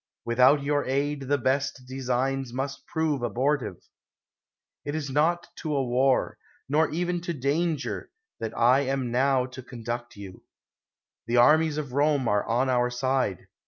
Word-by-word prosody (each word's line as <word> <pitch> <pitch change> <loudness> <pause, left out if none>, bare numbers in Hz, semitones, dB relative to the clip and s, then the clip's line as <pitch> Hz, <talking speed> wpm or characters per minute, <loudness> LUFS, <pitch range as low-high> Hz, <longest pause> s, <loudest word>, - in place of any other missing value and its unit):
Without 130 +5 +4
your 145 0 +1
aid 140 +1 -1
the 145 +1 +2
best 135 +1 -1
designs 130 0 -1
must 135 +2 -5
prove 160 -4 -1
abortive. 120 - -1 1.0
It 145 - -4
is 145 -3 -3
not 165 +5 +2
to 155 -3 -3
a 135 - +1
war, 130 +2 +1 0.3
nor 150 +3 +2
even 175 +2 -1
to 170 0 -3
danger, 150 +3 -1 0.3
that 110 - -5
I 125 +3 +5
am 135 -3 -1
now 130 +1 +2
to 130 0 -9
conduct 120 -1 -6
you; 100 -3 -10 0.9
the 120 +1 +1
armies 155 +4 +5
of 150 -3 -3
Eome 140 +1 +1
are 105 -2 +2
on 120 +3 +1
our 125 -1 +2
side. 125 -5 -1
135 Hz, 150 wpm, -26 LUFS, 125-145 Hz, 1.0 s, I